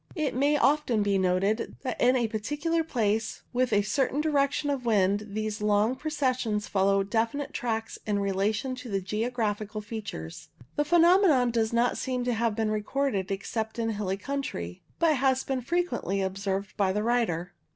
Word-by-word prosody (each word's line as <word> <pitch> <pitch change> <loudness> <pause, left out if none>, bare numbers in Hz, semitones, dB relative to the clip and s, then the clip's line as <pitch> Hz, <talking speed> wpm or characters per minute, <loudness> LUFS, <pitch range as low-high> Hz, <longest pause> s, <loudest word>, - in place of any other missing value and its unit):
It 310 -4 -1
may 285 +4 +2
often 280 -7 +2
be 200 -1 +2
noticed 190 +4 0
that 255 -3 -3
in 250 +1 +5
a 240 -3 +2
particular 295 +10 -1
place 220 -7 -1
with 250 0 +1
a 205 -1 +3
certain 270 +5 0
direction 290 -1 +1
of 270 -3 -2
wind 205 -2 +2
these 215 0 -3
long 210 +3 +2
processions 255 -7 -1
follow 195 0 +2
definite 230 +7 -1
tracks 225 -3 -3
in 205 -1 +1
relation 200 +5 0
to 250 -1 -8
the 195 -2 0
geographical 215 +1 -2
features. 205 - -7 0.3
The 295 - +1
phenomenon 340 -6 +5
does 225 -1 +1
not 235 +1 +1
seem 255 -1 -2
to 245 0 0
have 225 -1 0
been 220 -1 0
recorded 215 -2 -1
except 220 +3 -3
in 225 -1 0
hilly 200 -2 -2
country, 200 - -4 0.2
but 320 -4 +3
has 260 0 +2
frequently 270 - -1
been 195 - +1
observed 195 +1 -3
by 195 -2 +2
the 210 +2 -1
writer. 215 -8 0
225 Hz, 165 wpm, -28 LUFS, 205-265 Hz, 0.3 s, in